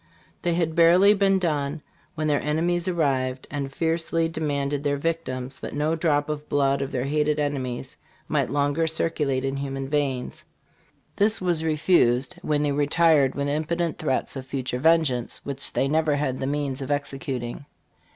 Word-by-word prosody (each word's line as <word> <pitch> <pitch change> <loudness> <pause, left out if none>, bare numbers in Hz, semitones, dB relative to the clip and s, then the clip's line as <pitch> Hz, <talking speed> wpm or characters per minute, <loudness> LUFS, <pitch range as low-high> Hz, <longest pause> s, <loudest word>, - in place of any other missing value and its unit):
This 170 -2 0
had 165 -2 0
barely 175 +5 +6
been 195 -1 +3
done 150 -4 -1 0.3
when 155 -1 -2
their 145 -1 +2
enemies 170 +4 0
arrived 135 -7 0
and 140 -1 -3
fiercely 165 +2 0
demanded 145 -3 -2
their 145 -1 0
victims, 140 -5 -3
that - - -6
no 150 +2 +1
drop 150 -3 +1
of 150 -1 -5
blood 140 -1 +2
of 135 - -3
their 125 0 -2
hated 150 +1 +1
enemies 135 -4 -3 0.3
might - - 0
longer 145 +4 +1
circulate 150 -4 -1
in 135 0 -2
human 135 -1 -4
veins. 140 -3 -2 0.7
This 215 +2 +4
was 175 -3 0
refused, 150 -6 +2
when 150 -1 0
they 145 - +1
retired 145 -1 +3
with 140 0 -1
impotent 160 +3 -1
threats 140 -3 -1
of 130 -1 -7
future 130 -2 -3
vengeance, 155 -6 +2
which 140 -1 -1
they 135 - +1
never 155 0 +2
had 135 -3 -1
the 135 - -2
means 140 -2 -2
of 135 - -5
executing. 135 -2 -3
145 Hz, 160 wpm, -25 LUFS, 135-160 Hz, 0.7 s, barely